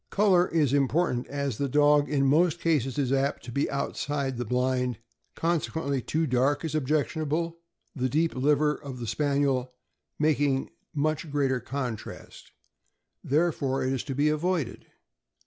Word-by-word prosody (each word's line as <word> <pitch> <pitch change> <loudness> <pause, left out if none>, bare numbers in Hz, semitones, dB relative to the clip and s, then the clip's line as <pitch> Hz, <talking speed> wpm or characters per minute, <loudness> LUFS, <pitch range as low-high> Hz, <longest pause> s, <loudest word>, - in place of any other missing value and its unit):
Color 190 -3 +4
is 150 -5 +1
important, 140 -2 +1
as 140 -5 -3
the 140 -1 0
dog 145 +1 +4
in 140 -2 +2
most 165 +4 +3
cases 145 -7 0
is 135 -2 +1
apt 135 +1 0
to 120 - -8
be 140 +4 0
outside 140 -1 -2
the 120 - -3
blind, 125 0 0 0.4
consequently 160 -4 -1
too 160 +6 -1
dark 135 +3 +1
is 160 - -3
objectionable; 155 +3 -1 0.4
the 130 -2 -1
deep 160 +5 +1
liver 150 +3 +2
of 140 -4 -8
the 120 - -5
Spaniel 140 -1 0 0.4
making 145 -3 +1 0.2
much 155 +2 -1
greater 135 -3 +1
contrast, 125 -3 -6 0.7
there 160 +5 +2
fore 135 -3 -2
it 130 - 0
is 130 - -2
to 135 - -4
be 145 +2 +2
avoided. 155 -3 -1
140 Hz, 145 wpm, -27 LUFS, 130-155 Hz, 0.7 s, Color